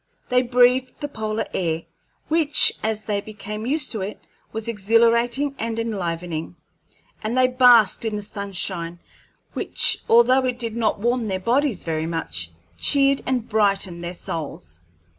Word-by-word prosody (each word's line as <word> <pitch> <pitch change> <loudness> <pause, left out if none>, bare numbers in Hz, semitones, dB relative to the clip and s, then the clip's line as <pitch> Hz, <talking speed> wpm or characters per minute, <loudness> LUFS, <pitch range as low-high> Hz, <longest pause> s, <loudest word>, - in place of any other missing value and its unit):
They 250 -1 +4
breathed 250 +1 +3
the 290 - -3
polar 220 -5 -3
air, 165 -2 -1 0.4
which, 310 -2 +4
as 215 0 -2
they 205 -1 -1
became 210 +1 -7
used 295 +1 -1
to 220 - -3
it, 200 +3 -5 0.3
was 220 +1 -5
exhilarating 235 +5 +2
and 225 0 -3
enlivening, 175 -7 -3 0.7
and 225 +4 -2
they 255 0 +5
basked 245 -6 +5
in 220 -2 -2
the 210 - -4
sunshine, 190 -4 -5 0.6
which, - - +2
although 255 +3 +5
it 250 -1 -2
did 230 -2 -4
not 225 -2 +1
warm 240 +1 0
their 190 -2 -2
bodies 240 +1 0
very 160 -1 -2
much, 90 - -3 0.3
cheered 275 -1 +3
and 250 -3 -1
brightened 195 -5 0
their 175 +1 -4
souls. 150 - -6
220 Hz, 145 wpm, -22 LUFS, 190-250 Hz, 0.7 s, they